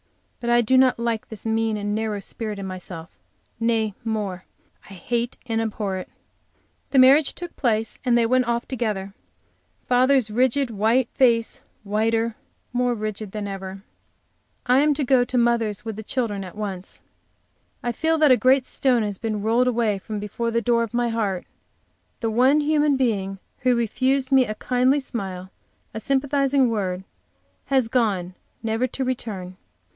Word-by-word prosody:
But 235 - -3
I 240 0 +5
do 240 +3 +2
not 260 -1 +4
like 230 -1 -2
this 220 -1 -8
mean 225 -1 0
and 205 0 -2
narrow 215 -1 -2
spirit 215 +1 -5
in 195 - -5
myself; 185 -2 -8 0.5
nay 225 -2 +1
more, 205 -5 -3 0.4
I 195 - -10
hate 235 +6 -2
and 225 -1 -1
abhor 210 -3 -2
it. 185 - -7 0.8
The 275 - 0
marriage 270 +3 +6
took 350 -1 -8
place 225 -4 -1
and 245 -2 +3
they 235 - +4
all 230 - -1
went 255 -1 +3
off 235 0 -1
together, 210 -6 -3 0.7
father's 255 -2 +3
rigid, 255 +3 +1
white 225 +4 +2
face, 235 -4 +2 0.2
whiter, 225 +2 0 0.4
more 245 0 +1
rigid 215 -2 -5
than 210 -1 -4
ever. 195 0 -7 0.8
I 250 +2 +4
am 295 0 +3
to 290 - -1
go 255 -1 +4
to 250 +1 -2
mother's 235 -3 +1
with 220 -2 -4
the 220 - -6
children 215 -3 -2
at 185 +1 -10
once. 195 -3 -5 0.8
I 240 - 0
feel 320 +7 +1
that 305 -3 +5
a - - +8
great 260 +1 +4
stone 250 -4 +1
has 205 -2 -3
been 215 -3 -3
rolled 235 +3 +3
away 230 -5 +1
from 215 +2 -6
before 210 +3 -3
the 230 0 0
door 235 +1 +3
of 230 0 -3
my 240 0 +1
heart; 205 -5 -1 0.8
the 225 -2 0
one 260 +6 +4
human 295 -1 +2
being 200 -7 0 0.2
who 250 -1 +2
refused 260 +4 0
me 265 -2 +5
a 215 - -4
kindly 255 +4 +2
smile, 190 -8 -6 0.4
a 220 - -4
sympathizing 275 0 +2
word, 190 -4 -2 0.6
has 265 -3 +2
gone, 205 -7 0 0.3
never 225 +3 0
to 260 +2 -3
return. 195 -8 -4
230 Hz, 170 wpm, -23 LUFS, 210-255 Hz, 0.8 s, a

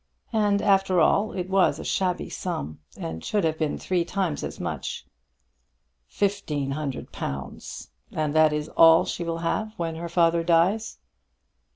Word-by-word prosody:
And 205 -2 +2
after 195 -2 +3
all 200 +6 +3
it 180 -1 -3
was 190 0 +3
a - - -7
shabby 180 -2 -1
sum, 155 - -5 0.2
and 80 0 -5
should 210 -3 0
have 160 -1 0
been 155 -2 -1
three 180 -2 0
times 180 -3 -2
as - - -6
much." - - -4 1.0
"Fifteen 160 -9 -1
hundred 140 -2 -4
pounds! 70 -1 -6 0.2
And 155 -2 -1
that 155 -1 +5
is 150 0 -2
all 165 0 +6
she 175 - -3
will 165 -1 -2
have 215 +5 -1
when 165 -1 -3
her 170 +1 -5
father 170 -1 +3
dies?" 180 +6 +2
170 Hz, 155 wpm, -25 LUFS, 155-195 Hz, 1.0 s, all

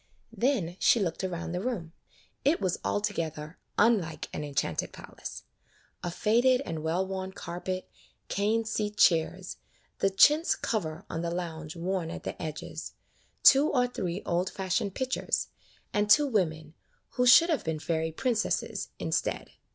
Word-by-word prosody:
Then 210 -10 0
she 235 - +5
looked 180 -2 -2
around 175 -2 -3
the 180 +1 -2
room. 195 -9 -3 0.5
It 295 +4 +3
was 185 -3 -1
altogether 150 - -2 0.2
unlike 205 -8 +2
an 150 - -3
enchanted 140 - -2
palace. - - -9 0.6
A 175 - -1
faded 240 +8 +3
and 165 -3 -4
well 165 +4 0
worn 190 0 -5
carpet, 185 +1 -5 0.4
cane 220 +3 +1
seat 210 -1 -2
chairs, 175 +2 +2 0.4
the 195 - +3
chintz 300 - +5
cover 165 -8 -3
on 165 - -4
the 170 - -2
lounge 165 -2 -5
worn 175 0 -2
at - - -7
the - - -6
edges, 155 -1 -6 0.5
two 280 +2 +7
or 250 -2 +3
three 190 -6 -4
old 175 +2 0
fashioned 190 +1 -2
pictures, 260 0 -1 0.4
and 210 0 +1
two 295 +7 +7
women 160 - -1 0.2
— - - -42
who 250 0 +1
should 335 +7 +8
have 310 - 0
been 160 -1 -2
fairy 160 +1 -1
princesses 225 +6 -1
— - - -47
instead. - - -2
185 Hz, 150 wpm, -29 LUFS, 165-220 Hz, 0.6 s, should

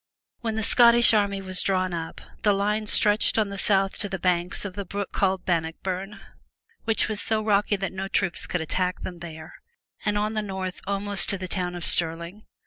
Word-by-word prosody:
When 225 -2 -3
the 220 - -2
Scottish 235 +1 +5
army 200 -2 +1
was 185 -2 0
drawn 185 -2 0
up, 165 -1 -6 0.2
the 210 - +3
line 210 +2 -1
stretched 210 +1 +4
on 215 -2 +1
the 200 - -6
south 195 -1 +1
to 205 - 0
the 190 - -3
banks 180 +1 0
of 195 - -5
the 200 - -5
brook 200 +2 -5
called 190 -1 0
Bannockburn, 185 +4 -3 0.7
which 225 -1 +1
are 215 - -3
so 215 +1 -1
rocky 205 -1 +2
that 195 -1 -4
no 190 +1 -4
troops 195 -2 0
could 180 - -2
attack 180 +3 -2
them 175 -2 -7
there, 160 -2 -10 0.5
and 210 -1 0
on 210 +1 -1
the 215 - -1
north 190 -3 -5
almost 200 -1 0
to 200 - +3
the 185 0 -6
town 180 -1 -3
of 175 - -4
Stirling. 170 +5 +3
195 Hz, 200 wpm, -25 LUFS, 180-210 Hz, 0.7 s, Scottish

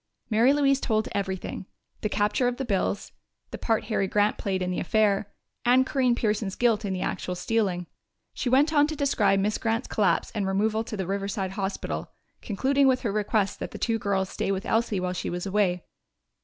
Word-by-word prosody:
Mary 230 +5 +5
Louise 280 -1 +3
told 220 -4 0
everything 190 -1 -3 0.3
the 215 - -1
capture 210 +5 +1
of 245 0 -1
the 270 - -3
bills, 200 -2 -1 0.4
the - - -5
part 225 -2 +1
Harry 205 -4 0
Grant 210 +2 +2
played 190 -2 -1
in 180 - -2
the 180 - -2
affair, 205 0 +1 0.3
and 250 +2 +5
Corinne 255 -3 +2
Pearson's 210 -4 -1
guilt 230 -4 +2
in 200 - -2
the 185 -1 -2
actual 180 - -3
stealing. 185 -2 0 0.5
She 250 - -2
went 285 +5 +4
on 295 -1 +5
to 310 - -4
describe 210 -9 +2
Miss 210 +2 0
Grant's 230 +2 -1
collapse 205 -3 +1
and 205 -4 -1
removal 215 +3 +1
to 215 - -5
the 190 - -2
Riverside 195 0 -2
Hospital, 195 0 -3 0.3
concluding 270 +6 +2
with 260 -1 +3
her 230 - -1
request 210 -1 0
that - - -4
the - - -8
two 230 -1 0
girls 195 -2 0
stay 195 - -2
with 195 +2 -2
Elsie 225 -4 +1
while 180 0 -2
she 180 - -3
was 175 +1 -4
away. 190 -3 +1
210 Hz, 195 wpm, -26 LUFS, 195-235 Hz, 0.5 s, Mary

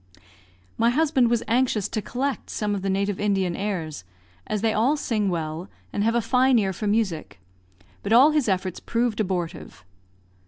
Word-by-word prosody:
My 230 - +4
husband 270 -2 +2
was 235 -1 +1
anxious 235 -4 +1
to 215 - -2
collect 265 +5 -3
some 210 -1 -2
of 200 - -2
the 195 - -2
native 200 0 -1
Indian 195 -4 0
airs, 170 - -4 0.4
as 210 - -2
they 220 0 +1
all 250 +8 +2
sing 215 -7 0
well, 165 +1 -4 0.2
and 205 - 0
have 230 +2 +2
a 235 - +3
fine 255 +3 +3
ear 195 -3 +1
for 210 +4 -4
music, 190 - -1 0.6
but - - -4
all 260 +7 +7
his 300 -7 +1
efforts 185 -1 -1
proved 230 -2 -1
abortive. 175 - -4
210 Hz, 170 wpm, -24 LUFS, 190-235 Hz, 0.6 s, all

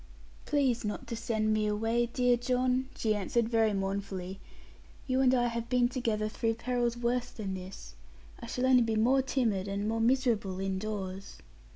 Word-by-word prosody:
'Please 265 -5 +1
not 210 +5 -4
to 235 -1 -5
send 220 -1 0
me 215 0 +1
away, 225 +3 +1
dear 245 0 +2
John,' 255 +1 0
she 220 -1 +1
answered 215 +3 0
very 225 -2 +2
mournfully; 195 -1 -3 0.7
'you 260 -1 +1
and 260 -1 +5
I 240 -1 +2
have 235 0 -3
been 250 -1 +3
together 225 -4 -1
through 225 +1 -1
perils 240 0 -1
worse 245 +1 0
than 205 -6 -5
this. 185 - -8 0.5
I - - -8
shall 250 - -1
only 260 -1 +6
be 225 -1 +1
more 250 +5 +4
timid, 225 -8 0
and 200 +1 -2
more 225 +1 0
miserable, 230 -6 +1
indoors.' 195 0 -4
230 Hz, 170 wpm, -30 LUFS, 205-245 Hz, 0.7 s, only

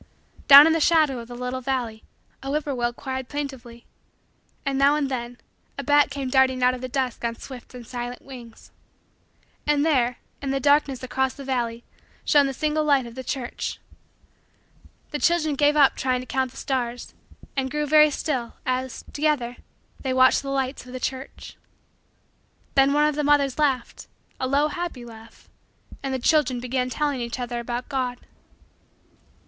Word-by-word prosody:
Down 280 +1 +11
in 325 - +4
the 325 - +1
shadow 310 -5 +3
of 230 - -9
the 245 - -9
little 250 +1 -4
valley, 245 -4 -3 0.4
a 270 - -6
whip 300 +2 0
poor 285 - -2
will 240 -1 0
cried 260 +1 -6
plaintively, 260 -5 -6 0.8
and, 275 0 0
now 280 +1 +5
and 285 -3 -1
then, 240 -1 -4 0.4
a - - -4
bat 290 0 +4
came 275 -1 -4
darting 260 -1 +3
out 250 0 +4
of 255 - -6
the 255 - -5
dusk 255 -2 -2
on 230 0 -1
swift 255 0 -11
and 245 -1 -9
silent 245 +1 -6
wings. 245 -4 -12 1.0
And 295 0 +3
there, 250 -6 +2 0.2
in 275 - -3
the 275 0 0
darkness 285 -1 +2
across 265 0 -1
the 280 - -9
valley, 240 -3 -2 0.4
shone 290 -2 +5
the 270 - -3
single 305 +2 0
light 280 -4 +3
of 235 - -9
the 260 +2 -7
church. 255 -1 -4 1.3
The 295 - -3
children 315 +1 +2
gave 290 +1 +3
up 285 -3 +5
trying 255 -1 0
to - - -9
count 260 0 -1
the - - -16
stars 245 -2 -3 0.4
and 265 -1 -1
grew 300 +2 -1
very 305 +1 +6
still, 265 -5 -3
as, 255 0 -3
together, 285 -5 0 0.4
they 260 -1 -2
watched 260 0 +5
the 275 - -6
lights 270 0 -2
of 250 - -10
the 255 - -5
church. 260 +1 -6 1.2
Then 275 0 +4
one 295 +1 +4
of 300 - 0
the 300 +1 -2
mothers 285 -1 +2
laughed, 270 -5 -1 0.3
a 260 - -1
low 285 +3 +2
happy 345 -8 -5
laugh, 225 -1 -14 0.5
and 270 - -3
the 260 - 0
children 260 -1 +2
began 250 +1 -2
telling 285 -1 -1
each 235 +1 -4
other 240 -1 -3
about 240 +1 -4
God. 255 -3 -2
265 Hz, 175 wpm, -24 LUFS, 245-285 Hz, 1.3 s, Down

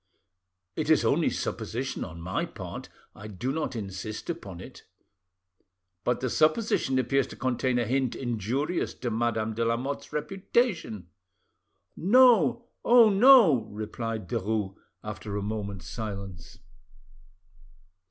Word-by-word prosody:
"It - - -2
is - - +4
only - - +3
supposition 130 +4 -3
on 85 -1 -8
my 90 +2 -2
part, - - -8 0.2
I 105 - -10
do 110 +6 -3
not 155 -3 -3
insist 105 - -5
upon 100 - -8
it." - - -11 1.2
"But 125 - 0
the 130 - -1
supposition 155 - +2
appears 130 +1 +1
to - - -10
contain 130 0 0
a 120 - +1
hint 130 +1 0
injurious 130 - -2
to 120 - -4
Madame 110 -1 -1
de 115 +2 -1
Lamotte's 120 +5 -2
reputation?" 165 - -1 0.9
"No, 235 - +4 0.2
oh 235 -3 +7
no!" 200 - +7
replied 110 0 -5
Derues, 105 -3 -2 0.3
after 105 -1 -5
a 100 - -3
moment's 100 -4 -4
silence. 100 -4 -7
120 Hz, 120 wpm, -27 LUFS, 105-150 Hz, 1.2 s, oh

